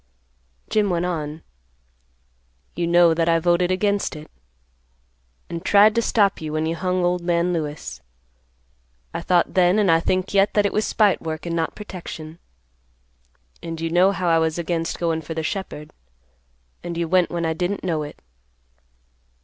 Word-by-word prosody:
Jim 215 Hz, -2 st, +1 dB
went 175 Hz, -1 st, 0 dB
on, 155 Hz, -3 st, -4 dB, 1.3 s
"You 170 Hz, -1 st, -1 dB
know 170 Hz, -1 st, +5 dB
that 165 Hz, +1 st, +1 dB
I 165 Hz, -, +4 dB
voted 175 Hz, +1 st, +2 dB
against 200 Hz, 0 st, 0 dB
it, 150 Hz, 0 st, -11 dB, 1.2 s
and 170 Hz, -1 st, -6 dB
tried 210 Hz, +1 st, +5 dB
to 230 Hz, -, +1 dB
stop 205 Hz, -5 st, +2 dB
you 155 Hz, -1 st, -5 dB
when 155 Hz, 0 st, 0 dB
you 165 Hz, +1 st, -1 dB
hung 180 Hz, 0 st, 0 dB
old 180 Hz, 0 st, 0 dB
man 170 Hz, 0 st, +1 dB
Lewis. 150 Hz, -, -5 dB, 1.1 s
I -, -, -3 dB
thought 175 Hz, -2 st, +1 dB
then, 180 Hz, +1 st, +4 dB
and 205 Hz, -5 st, +3 dB
I 165 Hz, -, +5 dB
think 185 Hz, +3 st, -1 dB
yet, 200 Hz, 0 st, +3 dB
that 205 Hz, -1 st, +3 dB
it 200 Hz, -, 0 dB
was 215 Hz, -, 0 dB
spite 210 Hz, -3 st, +2 dB
work 160 Hz, 0 st, -5 dB
and 170 Hz, -1 st, -2 dB
not 165 Hz, -1 st, -2 dB
protection; 170 Hz, -5 st, -8 dB, 1.2 s
and 165 Hz, -1 st, -6 dB
you 165 Hz, 0 st, -3 dB
know 180 Hz, +3 st, +4 dB
how 185 Hz, -2 st, -2 dB
I 165 Hz, -1 st, +4 dB
was 160 Hz, 0 st, 0 dB
against 165 Hz, -1 st, -2 dB
goin' 165 Hz, -2 st, -1 dB
for 160 Hz, +1 st, -7 dB
the 160 Hz, -, -2 dB
shepherd, 160 Hz, -4 st, -5 dB, 0.9 s
and 170 Hz, -1 st, -5 dB
you 170 Hz, -1 st, -1 dB
went 180 Hz, +1 st, +3 dB
when 170 Hz, -1 st, -2 dB
I 160 Hz, -, 0 dB
didn't 180 Hz, +5 st, -3 dB
know 165 Hz, -4 st, -1 dB
it. 145 Hz, -, -8 dB
170 Hz, 170 wpm, -22 LUFS, 165-185 Hz, 1.3 s, know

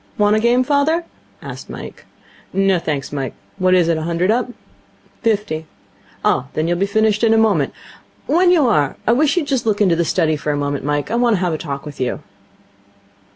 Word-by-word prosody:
'Want 210 Hz, 0 st, +3 dB
a -, -, +2 dB
game, 240 Hz, +3 st, +3 dB
father?' 295 Hz, +5 st, +1 dB, 0.4 s
asked -, -, -8 dB
Mike. -, -, -9 dB, 0.5 s
'No, 195 Hz, -2 st, +2 dB
thanks, 145 Hz, -4 st, -3 dB
Mike. 135 Hz, -4 st, -4 dB, 0.2 s
What 185 Hz, 0 st, +3 dB
is 175 Hz, -2 st, +3 dB
it? 165 Hz, -1 st, +1 dB
A -, -, -4 dB
hundred 170 Hz, +4 st, 0 dB
up?' 245 Hz, +2 st, 0 dB, 0.7 s
'Fifty.' 205 Hz, -9 st, -1 dB, 0.6 s
'Oh, 125 Hz, -, +2 dB
then 155 Hz, +1 st, -1 dB
you'll 175 Hz, 0 st, 0 dB
be 195 Hz, -, +1 dB
finished 220 Hz, +1 st, +1 dB
in 225 Hz, -1 st, +4 dB
a -, -, +3 dB
moment. 205 Hz, -11 st, +2 dB, 0.5 s
When 350 Hz, +4 st, +3 dB
you 340 Hz, -6 st, +4 dB
are, 150 Hz, -, +2 dB
I -, -, +3 dB
wish 295 Hz, +7 st, +2 dB
you'd 335 Hz, -, +1 dB
just 265 Hz, -5 st, -1 dB
look 210 Hz, -2 st, +1 dB
into 190 Hz, -5 st, +3 dB
the 170 Hz, -, +1 dB
study 160 Hz, -2 st, +1 dB
for 150 Hz, +1 st, -2 dB
a 145 Hz, -, -1 dB
moment, 145 Hz, -1 st, -2 dB
Mike. 145 Hz, +5 st, -1 dB
I -, -, 0 dB
want 240 Hz, -2 st, +3 dB
to -, -, -1 dB
have 180 Hz, -3 st, 0 dB
a -, -, -1 dB
talk 140 Hz, -2 st, -5 dB
with 145 Hz, -3 st, -8 dB
you.' 125 Hz, -, -2 dB
195 Hz, 210 wpm, -19 LUFS, 155-235 Hz, 0.7 s, in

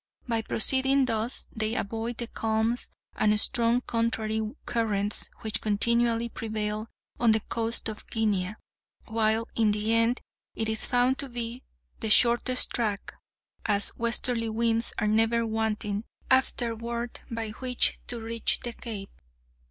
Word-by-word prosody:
By 230 Hz, -2 st, 0 dB
proceeding 265 Hz, +4 st, +4 dB
thus 230 Hz, 0 st, 0 dB
they 220 Hz, +1 st, -1 dB
avoid 225 Hz, +2 st, -3 dB
the 235 Hz, -, -3 dB
calms 225 Hz, +1 st, -1 dB, 0.3 s
and 210 Hz, 0 st, +3 dB
strong 235 Hz, +2 st, +3 dB
contrary 220 Hz, -2 st, -1 dB, 0.2 s
currents 210 Hz, -3 st, 0 dB
which 220 Hz, 0 st, -1 dB
continually 235 Hz, +2 st, +1 dB
prevail 215 Hz, -1 st, -3 dB, 0.3 s
on 235 Hz, -2 st, +5 dB
the 220 Hz, -, +2 dB
coast 230 Hz, +2 st, -2 dB
of 215 Hz, -1 st, -7 dB
Guinea, 210 Hz, -3 st, 0 dB, 0.5 s
while, 220 Hz, 0 st, +1 dB
in 220 Hz, -2 st, +3 dB
the 210 Hz, +2 st, 0 dB
end, 230 Hz, +2 st, +3 dB, 0.4 s
it 220 Hz, -, -1 dB
is 220 Hz, 0 st, -1 dB
found 250 Hz, +2 st, +2 dB
to 275 Hz, -, -3 dB
be 240 Hz, 0 st, -4 dB, 0.4 s
the 220 Hz, -, -3 dB
shortest 240 Hz, +3 st, +4 dB
track, 215 Hz, -5 st, -2 dB, 0.5 s
as 205 Hz, -1 st, +3 dB
westerly 235 Hz, 0 st, +1 dB
winds 230 Hz, +1 st, +2 dB
are 215 Hz, -, 0 dB
never 225 Hz, +2 st, +2 dB
wanting 220 Hz, -2 st, -1 dB, 0.3 s
afterward 235 Hz, -2 st, 0 dB
by 230 Hz, -2 st, -3 dB
which 250 Hz, +2 st, 0 dB
to 240 Hz, -, -2 dB
reach 230 Hz, 0 st, 0 dB
the 240 Hz, -, -5 dB
Cape. 215 Hz, -5 st, -7 dB
225 Hz, 135 wpm, -27 LUFS, 220-235 Hz, 0.5 s, on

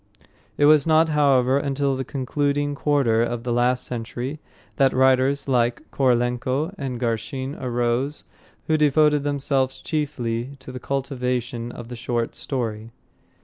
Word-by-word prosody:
It 145 Hz, -, +4 dB
was 150 Hz, 0 st, +5 dB
not 160 Hz, 0 st, +4 dB
however, 140 Hz, -3 st, +3 dB
until 140 Hz, -1 st, 0 dB
the 130 Hz, -, -3 dB
concluding 145 Hz, +2 st, -1 dB
quarter 140 Hz, -6 st, +2 dB
of 120 Hz, 0 st, -2 dB
the 120 Hz, 0 st, -1 dB
last 125 Hz, +1 st, +1 dB
century 125 Hz, +4 st, -5 dB, 0.4 s
that 135 Hz, -2 st, +4 dB
writers 130 Hz, +2 st, +3 dB
like 120 Hz, -2 st, 0 dB
Korolenko 130 Hz, +5 st, +1 dB
and 130 Hz, -7 st, -4 dB
Garshin 130 Hz, +3 st, -2 dB
arose, 125 Hz, +3 st, -1 dB, 0.4 s
who 155 Hz, -, +2 dB
devoted 150 Hz, 0 st, +4 dB
themselves 135 Hz, -2 st, 0 dB
chiefly 135 Hz, -5 st, -3 dB
to 130 Hz, -1 st, -11 dB
the 125 Hz, -, -7 dB
cultivation 125 Hz, -3 st, -3 dB
of 120 Hz, -1 st, -9 dB
the 125 Hz, -, -6 dB
short 120 Hz, 0 st, -2 dB
story. 115 Hz, -4 st, -4 dB
130 Hz, 135 wpm, -23 LUFS, 120-145 Hz, 0.4 s, was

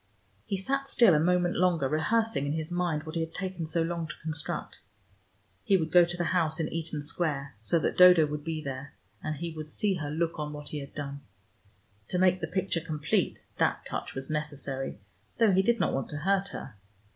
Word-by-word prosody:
He 200 Hz, -3 st, -1 dB
sat 275 Hz, +8 st, -1 dB
still 235 Hz, -8 st, +6 dB
a 150 Hz, -, +4 dB
moment 175 Hz, +2 st, +2 dB
longer, 175 Hz, -6 st, +2 dB
rehearsing 160 Hz, +2 st, +1 dB
in 145 Hz, -, 0 dB
his 160 Hz, +1 st, -3 dB
mind 175 Hz, -4 st, 0 dB
what 155 Hz, 0 st, -7 dB
he 165 Hz, -, -1 dB
had 160 Hz, 0 st, -5 dB
taken 180 Hz, -3 st, -4 dB
so 165 Hz, +1 st, +1 dB
long 165 Hz, -1 st, -2 dB
to -, -, -7 dB
construct. 155 Hz, -2 st, -3 dB, 0.8 s
He 195 Hz, -, +4 dB
would 160 Hz, -3 st, -2 dB
go 175 Hz, 0 st, +7 dB
to 175 Hz, +1 st, -5 dB
the 175 Hz, -, 0 dB
house 160 Hz, -2 st, +1 dB
in 160 Hz, -, 0 dB
Eaton 160 Hz, -2 st, -2 dB
Square, 145 Hz, -3 st, -2 dB
so 115 Hz, +10 st, +3 dB
that 165 Hz, -, -1 dB
Dodo 180 Hz, -3 st, +9 dB
would 150 Hz, 0 st, -4 dB
be 160 Hz, -1 st, -3 dB
there, 135 Hz, 0 st, -6 dB, 0.3 s
and 155 Hz, -, -3 dB
he 170 Hz, +3 st, -4 dB
would 155 Hz, -1 st, -7 dB
see 200 Hz, +5 st, +1 dB
her 150 Hz, -3 st, -4 dB
look 165 Hz, +2 st, -1 dB
on 150 Hz, 0 st, -3 dB
what 150 Hz, 0 st, -7 dB
he 150 Hz, -, -4 dB
had 140 Hz, -1 st, -9 dB
done. 140 Hz, -1 st, -5 dB, 0.9 s
To -, -, -1 dB
make 185 Hz, 0 st, +3 dB
the 160 Hz, -, -1 dB
picture 180 Hz, 0 st, -1 dB
complete 155 Hz, -1 st, -1 dB, 0.2 s
that -, -, +1 dB
touch -, -, -5 dB
was 135 Hz, 0 st, -4 dB
necessary, 145 Hz, -5 st, -2 dB, 0.4 s
though 225 Hz, -3 st, +5 dB
he 190 Hz, 0 st, +4 dB
did 235 Hz, +4 st, +2 dB
not -, -, +1 dB
want 135 Hz, -, -2 dB
to 150 Hz, -, -4 dB
hurt 195 Hz, +5 st, +1 dB
her. 125 Hz, -, -8 dB
160 Hz, 215 wpm, -29 LUFS, 150-180 Hz, 0.9 s, Dodo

